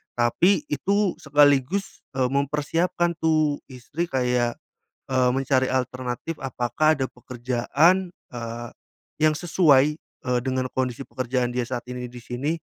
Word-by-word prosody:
tapi 170 Hz, -, +3 dB
itu 200 Hz, -1 st, +1 dB
sekaligus, 145 Hz, +5 st, +2 dB
eee, 130 Hz, -1 st, +2 dB
mempersiapkan 165 Hz, +5 st, 0 dB
tuh, 155 Hz, -2 st, +2 dB
istri 140 Hz, +6 st, -4 dB
kayak, 125 Hz, -3 st, 0 dB, 0.6 s
eee, 130 Hz, -1 st, +3 dB
mencari 130 Hz, -1 st, +2 dB
alternatif 130 Hz, +4 st, -3 dB
apakah 135 Hz, +4 st, +1 dB
ada 130 Hz, -, 0 dB
pekerjaan, 130 Hz, +9 st, +1 dB, 0.2 s
eee, 120 Hz, 0 st, -5 dB, 0.5 s
yang 155 Hz, 0 st, +5 dB
sesuai, 150 Hz, -5 st, +4 dB
eee, 125 Hz, -5 st, -3 dB
dengan 130 Hz, -1 st, 0 dB
kondisi 130 Hz, 0 st, -2 dB
pekerjaan 125 Hz, 0 st, -1 dB
dia 125 Hz, -, 0 dB
saat 120 Hz, -1 st, -4 dB
ini 125 Hz, 0 st, -5 dB
di 125 Hz, -, -10 dB
sini, 135 Hz, +8 st, -2 dB
130 Hz, 125 wpm, -24 LUFS, 125-155 Hz, 0.6 s, yang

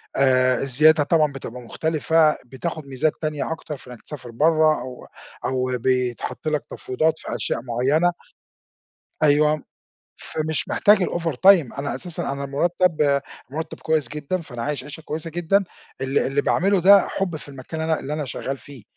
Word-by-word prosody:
آآ 130 Hz, -1 st, +3 dB
الزيادة 150 Hz, +3 st, +5 dB
طبعًا 155 Hz, -2 st, +2 dB
بتبقى 125 Hz, -2 st, -8 dB
مختلفة، 160 Hz, +4 st, +1 dB
بتاخد 155 Hz, +4 st, -5 dB
ميزات 140 Hz, +3 st, 0 dB
تانية 155 Hz, -1 st, -2 dB
أكتر 160 Hz, -2 st, -5 dB
في 130 Hz, -, -17 dB
إنَّك 125 Hz, -, -11 dB
تسافر 125 Hz, -5 st, -8 dB
برّه 155 Hz, +2 st, +3 dB
أو 125 Hz, 0 st, -8 dB, 0.4 s
أو 130 Hz, 0 st, 0 dB
بيتحط 125 Hz, +3 st, -1 dB
لَك 150 Hz, -2 st, 0 dB
تفويضات 155 Hz, +5 st, -1 dB
في -, -, -5 dB
أشياء 115 Hz, -, -1 dB
معيّنة 130 Hz, +8 st, +2 dB, 1.1 s
أيوه، 150 Hz, 0 st, +4 dB, 0.6 s
فمش 155 Hz, -1 st, -3 dB
محتاج 210 Hz, +1 st, +5 dB
الovertime 170 Hz, -3 st, +3 dB
أنا 145 Hz, -, -2 dB
أساسًا 175 Hz, -5 st, -4 dB
أنا 140 Hz, 0 st, -4 dB
المُرتَّب 150 Hz, -1 st, +1 dB, 0.3 s
مُرتَّب 160 Hz, +2 st, -5 dB
كويس 155 Hz, -5 st, 0 dB
جدًا، 150 Hz, +5 st, -3 dB
فأنا 120 Hz, -7 st, -7 dB
عايش 145 Hz, -1 st, -3 dB
عيشة 150 Hz, +3 st, -9 dB
كويسة 160 Hz, +1 st, -4 dB
جدًا 175 Hz, +4 st, +1 dB, 0.4 s
ال 135 Hz, +1 st, 0 dB
اللي 135 Hz, +2 st, +1 dB
باعمله 195 Hz, +5 st, +2 dB
ده 200 Hz, +1 st, +7 dB
حُب 185 Hz, -4 st, -2 dB
في 150 Hz, -, -9 dB
المكان 140 Hz, +4 st, -7 dB
اللي 160 Hz, 0 st, +1 dB
أنا -, -, -1 dB
اللي 145 Hz, -, -4 dB
أنا 150 Hz, -1 st, -3 dB
شغّال 135 Hz, +1 st, -4 dB
فيه، 140 Hz, -6 st, -13 dB
150 Hz, 160 wpm, -23 LUFS, 130-160 Hz, 1.1 s, ده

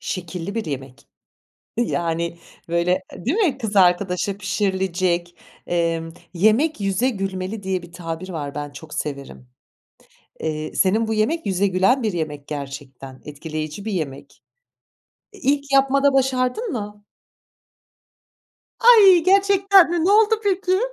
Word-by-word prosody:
şekilli 180 Hz, +1 st, -5 dB
bir 225 Hz, -, -2 dB
yemek. 135 Hz, -4 st, -7 dB, 0.7 s
Yani, 170 Hz, -6 st, -1 dB, 0.3 s
böyle, 170 Hz, +1 st, +1 dB, 0.2 s
eee, -, -, -11 dB
değil 290 Hz, -, +1 dB
mi, 340 Hz, -, +1 dB
kız 220 Hz, -5 st, -5 dB
arkadaşa 185 Hz, +1 st, +2 dB
pişirilecek. 185 Hz, -3 st, -1 dB, 0.3 s
Emm, 165 Hz, -1 st, -1 dB, 0.2 s
"Yemek 220 Hz, -, +2 dB
yüze 195 Hz, +6 st, +1 dB
gülmeli." 195 Hz, -1 st, -4 dB
diye 190 Hz, -1 st, -2 dB
bir 175 Hz, 0 st, -13 dB
tabir 170 Hz, +1 st, -6 dB
var, 145 Hz, -5 st, -5 dB
ben 145 Hz, 0 st, -4 dB
çok 150 Hz, +2 st, -11 dB
severim. 140 Hz, -3 st, -6 dB, 0.9 s
Eee, 155 Hz, -1 st, -4 dB
senin 215 Hz, +4 st, +2 dB
bu 220 Hz, -, -1 dB
yemek 290 Hz, +10 st, 0 dB
yüze 195 Hz, +1 st, +1 dB
gülen 195 Hz, +8 st, +2 dB
bir 215 Hz, -3 st, -1 dB
yemek 150 Hz, -4 st, -4 dB
gerçekten. 135 Hz, -2 st, -8 dB
Etkileyici 155 Hz, +5 st, -6 dB
bir 220 Hz, -, -3 dB
yemek. 155 Hz, -8 st, -5 dB, 0.9 s
Eee, 405 Hz, -, -14 dB
ilk 280 Hz, +1 st, +2 dB
yapmada 275 Hz, +1 st, +4 dB
başardın 265 Hz, -, 0 dB
mı? 210 Hz, -4 st, -6 dB, 1.8 s
Ay 405 Hz, -7 st, +7 dB
gerçekten 390 Hz, -1 st, +5 dB
mi! 340 Hz, -2 st, 0 dB
Ne 375 Hz, -, +3 dB
oldu 435 Hz, +1 st, +5 dB
peki? 380 Hz, -1 st, +1 dB
190 Hz, 130 wpm, -21 LUFS, 165-265 Hz, 1.8 s, Ay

